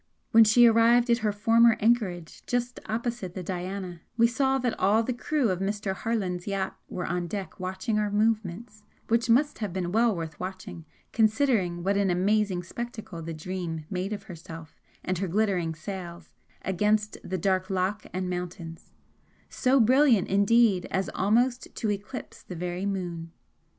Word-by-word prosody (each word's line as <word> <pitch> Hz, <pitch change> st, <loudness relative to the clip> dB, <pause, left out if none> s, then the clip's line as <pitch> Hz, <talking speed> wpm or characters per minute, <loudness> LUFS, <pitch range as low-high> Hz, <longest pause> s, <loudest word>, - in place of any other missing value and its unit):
When 225 Hz, 0 st, +8 dB
she 225 Hz, +3 st, +6 dB
arrived 235 Hz, +1 st, +5 dB
at 235 Hz, -, +3 dB
her 215 Hz, -2 st, 0 dB
former 230 Hz, +2 st, +4 dB
anchorage 205 Hz, -7 st, 0 dB
just 245 Hz, 0 st, -2 dB
opposite 225 Hz, -4 st, -3 dB
the 185 Hz, -, -5 dB
'Diana,' 180 Hz, -1 st, -5 dB, 0.2 s
we 230 Hz, -, +5 dB
saw 265 Hz, +3 st, +2 dB
that 245 Hz, -3 st, -1 dB
all 210 Hz, +4 st, +3 dB
the 255 Hz, -, -2 dB
crew 260 Hz, 0 st, 0 dB
of 180 Hz, -, -2 dB
Mr. 200 Hz, 0 st, -2 dB
Harland's 190 Hz, -4 st, -2 dB
yacht 195 Hz, -1 st, -2 dB
were 180 Hz, -, -4 dB
on 175 Hz, 0 st, -2 dB
deck 195 Hz, +1 st, -6 dB
watching 185 Hz, +4 st, -2 dB
our 210 Hz, -1 st, 0 dB
movements, 210 Hz, 0 st, -1 dB, 0.3 s
which 235 Hz, +1 st, +2 dB
must 285 Hz, +6 st, +3 dB
have 210 Hz, -4 st, -3 dB
been 175 Hz, -1 st, -3 dB
well 225 Hz, +1 st, +3 dB
worth 165 Hz, -2 st, -6 dB
watching 185 Hz, -3 st, -7 dB, 0.3 s
considering 220 Hz, -6 st, +2 dB
what 200 Hz, +2 st, +1 dB
an 200 Hz, -1 st, +2 dB
amazing 190 Hz, 0 st, +1 dB
spectacle 220 Hz, -3 st, -7 dB
the 165 Hz, +1 st, -6 dB
'Dream' 165 Hz, -1 st, -5 dB
made 185 Hz, +2 st, -2 dB
of 205 Hz, -2 st, -4 dB
herself 165 Hz, -4 st, -10 dB, 0.3 s
and 185 Hz, -2 st, -2 dB
her 195 Hz, -, -1 dB
glittering 180 Hz, -4 st, 0 dB
sails 175 Hz, 0 st, -8 dB, 0.3 s
against 210 Hz, +3 st, +1 dB
the 185 Hz, -, -3 dB
dark 185 Hz, +1 st, 0 dB
loch 190 Hz, +2 st, -1 dB
and 185 Hz, 0 st, -3 dB
mountains, 175 Hz, -2 st, -6 dB, 0.6 s
so 265 Hz, +1 st, +2 dB
brilliant 250 Hz, -2 st, +4 dB
indeed 200 Hz, -1 st, +3 dB
as 190 Hz, 0 st, -1 dB
almost 240 Hz, +6 st, +1 dB
to 215 Hz, -, -1 dB
eclipse 205 Hz, +5 st, -6 dB
the 180 Hz, -, -9 dB
very 180 Hz, +3 st, -3 dB
moon. 175 Hz, -4 st, -4 dB
200 Hz, 160 wpm, -27 LUFS, 180-230 Hz, 0.6 s, When